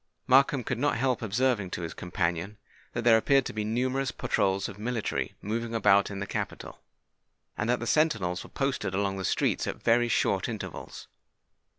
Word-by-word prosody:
Markham 135 Hz, 0 st, +4 dB
could 120 Hz, +1 st, -3 dB
not 145 Hz, +1 st, +1 dB
help 125 Hz, -1 st, 0 dB
observing 110 Hz, -2 st, 0 dB
to 85 Hz, -, -5 dB
his 85 Hz, -, -4 dB
companion 90 Hz, +2 st, -2 dB, 0.4 s
that 120 Hz, -, -2 dB
there 115 Hz, -1 st, +6 dB
appeared 135 Hz, +2 st, +3 dB
to -, -, -5 dB
be 105 Hz, 0 st, -2 dB
numerous 130 Hz, +5 st, 0 dB
patrols 95 Hz, 0 st, 0 dB
of 100 Hz, -, -10 dB
military 115 Hz, 0 st, -2 dB
moving 115 Hz, +2 st, -3 dB
about 100 Hz, -3 st, +4 dB
in 100 Hz, -, -6 dB
the 100 Hz, -, -3 dB
capital, -, -, -5 dB, 0.7 s
and 105 Hz, -, -2 dB
that 125 Hz, -, +2 dB
the 120 Hz, -, -4 dB
sentinels 115 Hz, -, +1 dB
were -, -, -12 dB
posted 135 Hz, -8 st, -2 dB
along 100 Hz, 0 st, 0 dB
the 95 Hz, -, -4 dB
streets -, -, 0 dB
at -, -, -5 dB
very 120 Hz, +1 st, +4 dB
short 115 Hz, -, +1 dB
intervals. -, -, -7 dB
115 Hz, 180 wpm, -28 LUFS, 100-125 Hz, 0.7 s, there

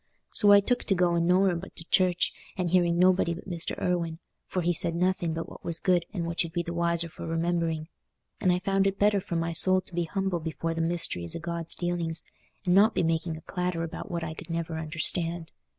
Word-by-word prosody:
So 205 Hz, -, +6 dB
I 200 Hz, 0 st, +8 dB
took 245 Hz, +5 st, 0 dB
to 195 Hz, -, +2 dB
going 170 Hz, -1 st, +2 dB
nowhere 185 Hz, 0 st, +4 dB
but 175 Hz, +3 st, -8 dB
to 165 Hz, -, -7 dB
church, 180 Hz, -2 st, +3 dB, 0.2 s
and 180 Hz, -2 st, -1 dB
hearing 175 Hz, -2 st, +3 dB
nobody 180 Hz, -1 st, +3 dB
but 175 Hz, -, -11 dB
Mr. 175 Hz, -3 st, -4 dB
Irwine, 170 Hz, -2 st, -1 dB, 0.3 s
for 185 Hz, -, -2 dB
he 175 Hz, +1 st, +2 dB
said 165 Hz, 0 st, 0 dB
nothing 175 Hz, -2 st, 0 dB
but 165 Hz, -, -4 dB
what -, -, -12 dB
was 165 Hz, -1 st, -3 dB
good 175 Hz, -2 st, +2 dB
and 175 Hz, -4 st, -3 dB
what 170 Hz, +1 st, -1 dB
you'd 165 Hz, -1 st, -7 dB
be 175 Hz, -, -1 dB
the 170 Hz, 0 st, -5 dB
wiser 170 Hz, 0 st, +1 dB
for 165 Hz, -, -9 dB
remembering. 165 Hz, -1 st, -1 dB, 0.5 s
And 185 Hz, -, +3 dB
I 180 Hz, -, +2 dB
found 195 Hz, +1 st, +1 dB
it 195 Hz, 0 st, -1 dB
better 205 Hz, -1 st, +3 dB
for 175 Hz, -, -5 dB
my 165 Hz, 0 st, -1 dB
soul 185 Hz, +3 st, +5 dB
to 185 Hz, -, -16 dB
be 175 Hz, 0 st, 0 dB
humble 190 Hz, 0 st, -1 dB
before 165 Hz, +1 st, -3 dB
the 165 Hz, -, -2 dB
mysteries 165 Hz, -, -1 dB
o' -, -, -3 dB
God's 170 Hz, -1 st, -2 dB
dealings, 170 Hz, -2 st, -2 dB, 0.4 s
and 180 Hz, -, +3 dB
not 200 Hz, +4 st, +5 dB
be -, -, +2 dB
making 165 Hz, 0 st, -1 dB
a -, -, -11 dB
clatter 180 Hz, -1 st, -2 dB
about 165 Hz, -, -6 dB
what 170 Hz, -2 st, -3 dB
I 160 Hz, -1 st, -4 dB
could 160 Hz, -, -11 dB
never 165 Hz, -1 st, -3 dB
understand. 165 Hz, +1 st, +1 dB
170 Hz, 230 wpm, -28 LUFS, 165-180 Hz, 0.5 s, I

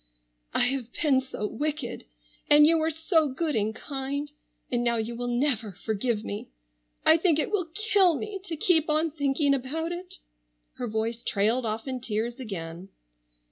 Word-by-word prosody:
"I -, -, +3 dB
have 265 Hz, -3 st, -2 dB, 0.2 s
been 275 Hz, -4 st, +4 dB
so 260 Hz, -5 st, -5 dB
wicked—and 240 Hz, -, 0 dB
you 325 Hz, +1 st, +5 dB
were 315 Hz, +1 st, +1 dB
so 320 Hz, 0 st, +2 dB
good 295 Hz, +3 st, -2 dB
and 215 Hz, 0 st, 0 dB
kind—and 280 Hz, -2 st, -4 dB
now 235 Hz, -1 st, +2 dB
you 230 Hz, +1 st, -2 dB
will 245 Hz, +1 st, -4 dB
never 240 Hz, -4 st, +2 dB
forgive 215 Hz, +3 st, -2 dB
me—I -, -, 0 dB
think 330 Hz, -2 st, +3 dB
it 310 Hz, +4 st, 0 dB
will 365 Hz, -6 st, -1 dB
kill 405 Hz, -5 st, +4 dB
me 420 Hz, -2 st, -5 dB
to 340 Hz, -4 st, -4 dB
keep 320 Hz, -1 st, +3 dB
on 310 Hz, +1 st, +2 dB
thinking 285 Hz, -1 st, +1 dB
about 295 Hz, +6 st, -2 dB
it—" 355 Hz, +1 st, -7 dB, 0.6 s
her 245 Hz, -, -3 dB
voice 225 Hz, +1 st, -2 dB
trailed 225 Hz, +4 st, +1 dB
off 220 Hz, +3 st, -3 dB
in 260 Hz, -1 st, -3 dB
tears 235 Hz, +2 st, -3 dB
again. 180 Hz, -5 st, -6 dB
260 Hz, 155 wpm, -27 LUFS, 220-315 Hz, 0.6 s, you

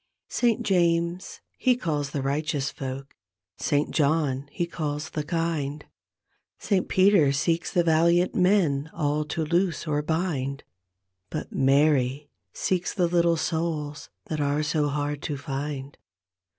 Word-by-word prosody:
Saint 235 Hz, -3 st, +1 dB
James 170 Hz, -1 st, +1 dB, 0.2 s
he 255 Hz, -1 st, +4 dB
calls 150 Hz, -, -2 dB
the 140 Hz, -1 st, -3 dB
righteous 140 Hz, -1 st, -1 dB
folk. 135 Hz, +1 st, -6 dB, 0.4 s
Saint 145 Hz, 0 st, +1 dB
John 145 Hz, -3 st, +1 dB
he 175 Hz, -, -1 dB
calls 150 Hz, -2 st, -4 dB
the 150 Hz, -, -2 dB
kind. 155 Hz, -3 st, -2 dB, 0.7 s
Saint 195 Hz, -3 st, 0 dB
Peter 185 Hz, -7 st, +5 dB
seeks 165 Hz, +5 st, 0 dB
the 175 Hz, -, +3 dB
valiant 170 Hz, +2 st, +3 dB
men 175 Hz, -6 st, +2 dB
all 150 Hz, 0 st, 0 dB
to 160 Hz, +1 st, -2 dB
loose 170 Hz, +1 st, 0 dB
or 150 Hz, -2 st, 0 dB
bind, 150 Hz, -4 st, -2 dB, 0.7 s
But -, -, -5 dB
Maty 140 Hz, 0 st, +2 dB, 0.2 s
seeks 185 Hz, -1 st, -1 dB
the 180 Hz, -4 st, +2 dB
little' 170 Hz, -1 st, +3 dB
souls 160 Hz, -3 st, -2 dB, 0.2 s
that 155 Hz, -2 st, -3 dB
are 145 Hz, +1 st, +1 dB
so 150 Hz, -1 st, +1 dB
hard 145 Hz, 0 st, -2 dB
to 150 Hz, -, -3 dB
iind. 140 Hz, 0 st, -5 dB
150 Hz, 130 wpm, -26 LUFS, 145-170 Hz, 0.7 s, Peter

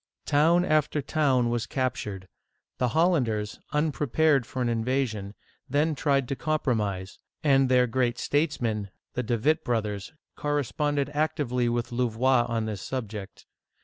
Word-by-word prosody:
Town 165 Hz, +4 st, +4 dB
after 155 Hz, -2 st, +2 dB
town 135 Hz, -4 st, +1 dB
was 120 Hz, -1 st, -1 dB
captured. 105 Hz, -7 st, -3 dB, 0.5 s
The 125 Hz, -, +2 dB
Hollanders, 120 Hz, -, +1 dB
un 150 Hz, +1 st, +1 dB
prepared 145 Hz, -2 st, +2 dB
for 130 Hz, -, -6 dB
an -, -, 0 dB
invasion, 115 Hz, -3 st, -1 dB, 0.3 s
then 150 Hz, +4 st, +2 dB
tried 140 Hz, -3 st, +1 dB
to 135 Hz, -, -1 dB
compromise; 110 Hz, -, -1 dB, 0.2 s
and 135 Hz, -3 st, +4 dB
their 125 Hz, -1 st, +5 dB
great 120 Hz, 0 st, 0 dB
statesmen, 120 Hz, -10 st, 0 dB, 0.2 s
the 125 Hz, -, -1 dB
De 120 Hz, 0 st, -1 dB
Witt 155 Hz, +8 st, +2 dB
brothers, 105 Hz, -4 st, -2 dB, 0.2 s
corresponded 145 Hz, 0 st, -1 dB
actively 140 Hz, -5 st, 0 dB
with 120 Hz, +1 st, -2 dB
Louvois 120 Hz, +1 st, +2 dB
on 115 Hz, -1 st, -1 dB
this 105 Hz, -4 st, -4 dB
subject. 105 Hz, -2 st, -6 dB
125 Hz, 135 wpm, -27 LUFS, 115-145 Hz, 0.5 s, their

